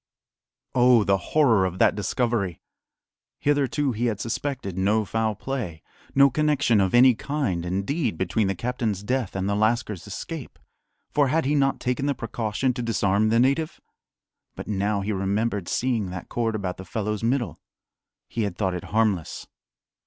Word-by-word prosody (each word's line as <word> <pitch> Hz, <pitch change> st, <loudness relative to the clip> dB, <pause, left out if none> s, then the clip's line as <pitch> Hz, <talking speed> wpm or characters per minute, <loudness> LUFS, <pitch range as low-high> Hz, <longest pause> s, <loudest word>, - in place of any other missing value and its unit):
Oh, 125 Hz, -3 st, +5 dB
the 100 Hz, -1 st, +3 dB
horror 120 Hz, -11 st, +4 dB
of 90 Hz, -1 st, -2 dB
that -, -, +4 dB
discovery! 105 Hz, -4 st, -1 dB, 0.8 s
Hitherto 145 Hz, -1 st, +1 dB
he 120 Hz, +1 st, -1 dB
had 105 Hz, -4 st, -2 dB
suspected 120 Hz, -5 st, -3 dB
no 105 Hz, +3 st, +2 dB
foul 110 Hz, +1 st, -1 dB
play, 105 Hz, -, -5 dB, 0.3 s
no 140 Hz, 0 st, +6 dB
connection 145 Hz, -6 st, +2 dB
of 95 Hz, +3 st, +1 dB
any 125 Hz, +1 st, +7 dB
kind, 120 Hz, -, -2 dB
indeed, 100 Hz, -, -1 dB
between 95 Hz, +4 st, 0 dB
the 95 Hz, -, -1 dB
captain's 115 Hz, -2 st, -2 dB
death 125 Hz, -2 st, -1 dB
and 95 Hz, 0 st, -1 dB
the 100 Hz, -, +1 dB
lascar's 110 Hz, -2 st, 0 dB
escape; 125 Hz, -, -7 dB, 0.5 s
for 145 Hz, -2 st, +3 dB
had 160 Hz, +3 st, +1 dB
he 145 Hz, -, +1 dB
not 135 Hz, -2 st, +2 dB
taken 125 Hz, +3 st, -1 dB
the 140 Hz, -, +1 dB
precaution 115 Hz, +2 st, -1 dB
to 125 Hz, -, -4 dB
disarm 110 Hz, -2 st, +1 dB
the 115 Hz, +1 st, +3 dB
native? 140 Hz, +6 st, +1 dB, 0.8 s
But -, -, -7 dB
now 100 Hz, 0 st, 0 dB
he 100 Hz, +2 st, -2 dB
remembered 100 Hz, 0 st, -1 dB
seeing 120 Hz, -6 st, 0 dB
that 90 Hz, -1 st, -7 dB
cord 115 Hz, -2 st, -1 dB
about 95 Hz, -4 st, -3 dB
the 95 Hz, -, -8 dB
fellow's 105 Hz, +2 st, -3 dB
middle. 120 Hz, -, 0 dB, 0.7 s
He 115 Hz, -, -3 dB
had 100 Hz, -5 st, -2 dB
thought 95 Hz, -3 st, 0 dB
it 90 Hz, -, -5 dB
harmless. 105 Hz, -6 st, 0 dB
110 Hz, 160 wpm, -25 LUFS, 100-130 Hz, 0.8 s, any